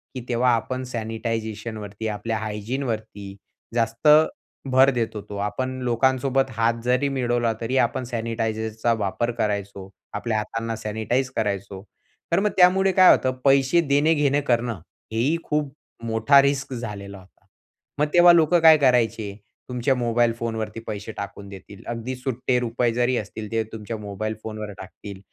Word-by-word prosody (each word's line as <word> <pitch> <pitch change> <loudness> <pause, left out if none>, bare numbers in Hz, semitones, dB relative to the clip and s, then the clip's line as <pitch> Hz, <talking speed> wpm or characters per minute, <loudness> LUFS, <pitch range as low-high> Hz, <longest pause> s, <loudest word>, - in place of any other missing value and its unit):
की 130 - -4
तेव्हा 125 +1 +2
आपण 130 +3 -3
सॅनिटायझेशन 115 -2 -4
वरती 105 +1 -6
आपल्या 110 +1 -3
हायजीन 110 +5 -4
वरती 110 -4 -5 0.4
जास्त 115 +4 0 0.6
भर 130 +1 +6
देत 115 -2 -2
होतो. 105 -1 -7
आपण 130 +6 -3
लोकांसोबत 130 +2 +1
हात 115 0 +1
जरी 125 +3 +2
मिळवला 120 -3 0
तरी 120 +3 -1
आपण 120 +2 -4
सॅनिटायझरचा 115 -1 -2
वापर 110 +2 -1
करायचो. 100 -2 -3 0.2
आपल्या 115 -2 -2
हातांना 115 +2 -3
सॅनिटाईज 110 +4 -2
करायचो. 100 -3 -3 0.5
तर 170 - +3
मग 210 +1 +2
त्यामुळे 190 +1 +5
काय 185 0 +8
होतं? 130 - -1
पैसे 135 +4 +4
देणे 145 +1 +3
घेणे 145 -2 +2
करणं 120 -6 0 0.3
हेही 125 +9 +1
खूप 150 -2 -2 0.3
मोठा 115 +5 +5
रिस्क 135 -1 -1
झालेला 100 -5 -6
होता. 90 - -17 0.7
मग 150 - +4
तेव्हा 175 0 +8
लोक 165 0 +3
काय 160 -2 +7
करायचे? 115 -6 +1 0.3
तुमच्या 125 +2 +1
मोबाईल 120 -1 +1
फोनवरती 110 -1 -3
पैसे 105 +1 -5
टाकून 100 0 -7
देतील. 100 0 -12
अगदी 120 +2 -4
सुट्टे 125 0 -1
रुपये 120 0 0
जरी 125 +1 +1
असतील, 105 0 -6
ते 115 -1 0
तुमच्या 110 +1 -5
मोबाईल 105 +1 -4
फोनवर 110 -1 -6
टाकतील. 95 +1 -10
115 Hz, 145 wpm, -23 LUFS, 110-130 Hz, 0.7 s, काय